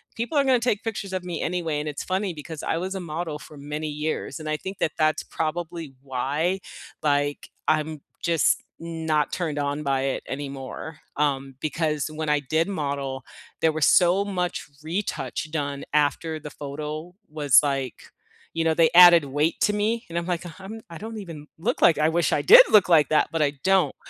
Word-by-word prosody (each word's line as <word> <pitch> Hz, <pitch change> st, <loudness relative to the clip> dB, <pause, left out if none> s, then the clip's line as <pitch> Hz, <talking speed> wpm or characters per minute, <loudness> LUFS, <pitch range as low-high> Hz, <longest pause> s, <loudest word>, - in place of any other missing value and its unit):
people 240 Hz, +7 st, -2 dB
are 280 Hz, -, +5 dB
gonna 260 Hz, -2 st, +4 dB
take 230 Hz, -4 st, 0 dB
pictures 215 Hz, -3 st, -4 dB
of 185 Hz, -1 st, -2 dB
me 175 Hz, -1 st, -4 dB
anyway," 165 Hz, -3 st, -1 dB
and 150 Hz, -, -4 dB
it's 145 Hz, -, -5 dB
funny 190 Hz, 0 st, -1 dB
because 155 Hz, 0 st, -8 dB
I -, -, 0 dB
was 190 Hz, +3 st, -3 dB
a 190 Hz, -, -3 dB
model 165 Hz, -2 st, -4 dB
for 150 Hz, -, -13 dB
many 150 Hz, +2 st, -4 dB
years 150 Hz, +2 st, -3 dB
and 155 Hz, -, -7 dB
I 155 Hz, -, +1 dB
think 190 Hz, +4 st, -7 dB
that 155 Hz, -, 0 dB
that's 155 Hz, 0 st, +2 dB
probably 165 Hz, -2 st, -4 dB
why, 140 Hz, +7 st, -1 dB, 0.4 s
like, 145 Hz, -1 st, 0 dB, 0.2 s
I'm 155 Hz, -1 st, 0 dB, 0.2 s
just 170 Hz, -2 st, +2 dB, 0.2 s
not 160 Hz, -2 st, -1 dB
turned 155 Hz, -5 st, -2 dB
on 145 Hz, +1 st, -2 dB
by 135 Hz, -2 st, +1 dB
it 135 Hz, 0 st, -2 dB
anymore, 140 Hz, +2 st, -6 dB, 0.2 s
um, 135 Hz, -2 st, 0 dB
because 155 Hz, -1 st, -1 dB
when 155 Hz, 0 st, -4 dB
I 150 Hz, 0 st, +3 dB
did 160 Hz, +6 st, 0 dB
model, 140 Hz, -7 st, -3 dB, 0.4 s
there 160 Hz, -, +4 dB
was 155 Hz, -1 st, +1 dB
so 180 Hz, +2 st, +5 dB
much 180 Hz, -3 st, -3 dB, 0.2 s
retouch 155 Hz, -, -3 dB
done 145 Hz, -3 st, -3 dB
after 155 Hz, +2 st, +1 dB
the 150 Hz, -, -8 dB
photo 150 Hz, +4 st, -6 dB, 0.2 s
was, 145 Hz, -4 st, +5 dB
like, 135 Hz, -3 st, -3 dB, 0.4 s
you 165 Hz, -, 0 dB
know, 160 Hz, 0 st, +3 dB
they 165 Hz, 0 st, +4 dB
added 175 Hz, -3 st, +9 dB
weight 145 Hz, +4 st, 0 dB
to 210 Hz, -, +3 dB
me 220 Hz, +3 st, 0 dB
and 170 Hz, -, -4 dB
I'm, 170 Hz, -, -1 dB
like, 175 Hz, -1 st, -2 dB, 0.2 s
I'm 215 Hz, +4 st, -8 dB
I 165 Hz, -, -8 dB
don't 220 Hz, +3 st, -7 dB
even 165 Hz, -7 st, -8 dB
look, 220 Hz, +10 st, -2 dB
like, 170 Hz, -, +6 dB
I 155 Hz, +1 st, +3 dB
wish 170 Hz, +1 st, +1 dB
I -, -, +2 dB
did 485 Hz, +6 st, +10 dB
look, 205 Hz, -4 st, +6 dB
like, 155 Hz, -4 st, +6 dB
that, 155 Hz, -, +3 dB
but, 165 Hz, -, -1 dB
I 145 Hz, -1 st, +3 dB
don't. 190 Hz, -7 st, +3 dB
160 Hz, 195 wpm, -25 LUFS, 145-175 Hz, 0.4 s, did